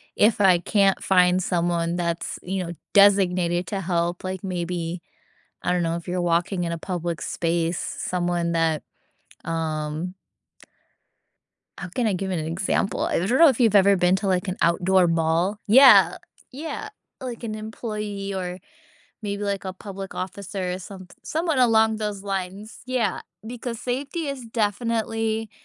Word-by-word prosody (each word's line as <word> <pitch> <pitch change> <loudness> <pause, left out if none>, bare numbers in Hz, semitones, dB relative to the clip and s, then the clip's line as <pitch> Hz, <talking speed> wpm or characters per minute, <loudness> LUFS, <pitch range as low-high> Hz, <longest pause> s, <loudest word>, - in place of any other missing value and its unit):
If 215 +1 +3
I 185 -3 +6
can't 195 +1 +2
find 180 -1 +4
someone 170 -1 0
that's, 170 -1 -2
you 190 +1 -3
know, 170 - -6 0.2
designated 180 -3 +4
to 195 +1 -3
help, 175 -1 -1
like, 185 -1 -4
maybe, 175 -2 -3 0.6
I 180 - +1
don't 180 -1 +1
know 165 0 0
if 170 - -8
you're 180 0 -2
walking 175 +2 0
in 170 - -2
a - - -2
public 170 -2 -4
space, 170 0 -1
someone 175 -1 -2
that, 165 -2 +1 0.6
um 160 +2 -3 1.6
how 190 - -6
can 235 +6 -1
I 215 - +2
give 190 +1 -3
an 180 - -1
example? 170 +5 -1
I - - +1
don't 205 +9 +1
know 330 0 +8
if 260 -3 0
you've 225 -4 +4
ever 200 0 +6
been 180 +1 +3
to, 195 +1 -4
like, 185 0 0
an 185 - -2
outdoor 180 +2 +3
mall? 165 +4 +1
Yeah 210 -7 +7 0.4
yeah, 320 +9 -5 0.3
like, 245 -2 -6
an 215 -2 -3
employee 210 -2 -5
or 180 -1 -4 0.6
maybe 205 -1 -4
like 200 -1 -2
a 185 - -4
public 195 0 -8
officer, 185 0 -4
or 180 - -4
some 185 0 -10 0.2
someone 320 -2 -1
along 220 -3 +4
those 210 -2 -3
lines, 195 +2 -5
yeah, 250 -6 0 0.3
because 235 0 -5
safety 275 +7 -3
is 275 -4 -5
definitely 225 0 -1
190 Hz, 155 wpm, -24 LUFS, 175-215 Hz, 1.6 s, know